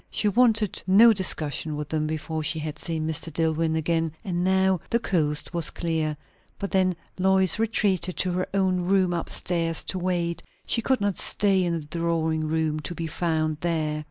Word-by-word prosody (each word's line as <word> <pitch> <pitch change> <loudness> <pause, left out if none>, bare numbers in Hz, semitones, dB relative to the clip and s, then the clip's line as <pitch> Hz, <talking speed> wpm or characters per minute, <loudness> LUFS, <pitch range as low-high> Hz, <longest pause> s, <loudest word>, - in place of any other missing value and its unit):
She 210 - 0
wanted 220 -1 +2
no 220 +5 +7
discussion 155 -5 +2
with 150 -1 -5
them 155 -1 -1
before 155 +1 -3
she 160 +2 0
had 155 -1 -5
seen 160 -2 -3
Mr. 160 +1 -2
Dillwyn 160 0 0
again; 165 0 0
and 175 -2 -1
now 190 0 +2
the 235 - +2
coast 155 -9 -1
was 170 -3 0
clear. 160 -3 -2 0.4
But 200 - -5
then 185 -2 +2 0.2
Lois 190 +1 +3
retreated 195 -5 0
to 185 - +1
her 185 +1 -1
own 190 -2 +1
room 185 0 +1
up 170 - -3
stairs 165 -2 -2
to 185 - -3
wait; 175 -2 -1 0.2
she 230 - +2
could 260 0 0
not 200 -2 -1
stay 195 -2 +2
in 170 -1 -1
the - - -12
drawing 160 0 -1
room, 155 -1 -1
to 175 +3 -5
be 165 - -4
found 155 -1 -1
there. 155 -3 -1
170 Hz, 185 wpm, -25 LUFS, 160-190 Hz, 0.4 s, no